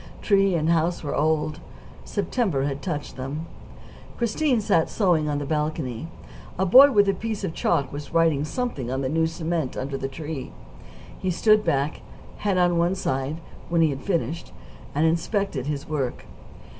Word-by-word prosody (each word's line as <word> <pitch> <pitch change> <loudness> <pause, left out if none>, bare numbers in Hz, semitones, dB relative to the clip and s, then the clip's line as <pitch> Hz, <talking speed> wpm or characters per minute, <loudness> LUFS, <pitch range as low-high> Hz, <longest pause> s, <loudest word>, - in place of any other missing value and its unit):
Tree 195 -3 +3
and 155 -1 0
house 170 +1 +1
were 145 - -2
old; 155 0 +1 0.5
September 200 - -1
had 140 0 -2
touched 145 0 -4
them. 140 +5 -4 0.7
Christine 245 +2 +1
sat 200 -6 +2
sewing 170 -7 +2
on 145 - 0
the 145 - -3
balcony. 150 -3 -2 0.5
A 190 - +1
boy 265 +9 +8
with 205 -4 +4
a 195 - +3
piece 215 +1 -4
of 175 -4 -2
chalk 145 -6 0
was 145 0 -7
writing 165 -4 +3
something 155 - -3
on 130 +1 -1
the 130 - -1
new 160 +2 +2
cement 165 -3 -2
under 135 +1 -3
the 135 - -2
tree. 150 0 -6 0.7
He 185 - -1
stood 215 +4 +4
back, 140 -2 0 0.4
head 200 -3 0
on 175 -1 +3
one 175 +2 +2
side, 140 -2 -2 0.3
when 170 -1 +2
he 160 -2 +4
had 135 - -5
finished, 170 -3 -2 0.4
and 150 +3 +3
inspected 165 - 0
his 145 -2 -3
work. 140 -5 -3
160 Hz, 170 wpm, -24 LUFS, 145-190 Hz, 0.7 s, boy